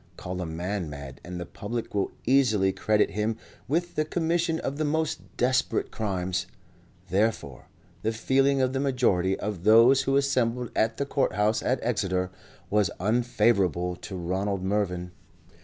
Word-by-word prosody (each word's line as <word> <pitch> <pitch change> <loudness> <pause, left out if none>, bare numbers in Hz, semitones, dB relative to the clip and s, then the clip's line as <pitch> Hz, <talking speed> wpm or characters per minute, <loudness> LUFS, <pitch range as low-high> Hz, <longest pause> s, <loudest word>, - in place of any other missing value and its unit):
Call 90 +1 -5
a 90 - -3
man 90 +2 -3
mad 70 -2 -9
and 90 0 -6
the 85 - -4
public 115 +6 -5
will 100 -1 0
easily 110 -7 +3
credit 105 +3 +2
him 105 +1 -1 0.3
with 175 +5 0
the 155 - +1
commission 165 +1 0
of 140 - -3
the 155 - 0
most 155 +1 -2
desperate 130 +1 +1
crimes; 95 -3 -2 0.6
therefore, 95 - -1 0.3
the 110 - 0
feeling 135 +4 +2
of 130 0 0
the 135 - 0
majority 120 -9 +1
of 100 -5 -4
those 115 +5 +7
who 135 +1 +1
assembled 125 -4 0
at 110 0 +1
the 140 - -1
Court 140 -1 0
House 105 +1 +1
at 130 - +1
Exeter, 95 -6 0 0.4
was 105 -3 +3
unfavourable 100 -5 +1
to 95 - -8
Ronald 95 +2 -2
Mervyn. 95 -3 -1
110 Hz, 155 wpm, -27 LUFS, 95-130 Hz, 0.6 s, those